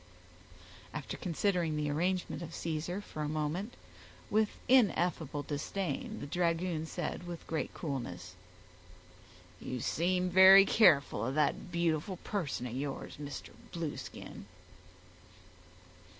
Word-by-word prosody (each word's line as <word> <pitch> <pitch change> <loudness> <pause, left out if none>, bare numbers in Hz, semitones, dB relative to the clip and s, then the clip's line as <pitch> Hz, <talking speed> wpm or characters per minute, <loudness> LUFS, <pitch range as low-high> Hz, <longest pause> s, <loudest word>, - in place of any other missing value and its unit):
After 150 -2 -4
considering 175 -2 0
the 150 -1 -1
arrangement 180 +4 -1
of 165 -1 -7
Caesar, 170 +4 -3
for 155 - -7
a 150 - -1
moment, 155 +9 -2 0.6
with 215 0 +3 0.2
ineffable 175 - +3
disdain, 195 - -3
the - - -4
dragoon 165 0 0
said, 175 - -4
with 170 -1 -7
great 160 - -2
coolness,— 90 - -5 1.3
"You 125 - -4
seem 180 +7 0
very 190 +2 +9
careful 145 - +4
of 130 +3 -2
that 155 +5 0
beautiful 170 +1 0
person 170 - -3
of 120 - -5
yours, 135 +1 -4
Mr. 145 -1 -7 0.2
Blueskin." 165 -3 -6
165 Hz, 110 wpm, -32 LUFS, 150-185 Hz, 1.3 s, very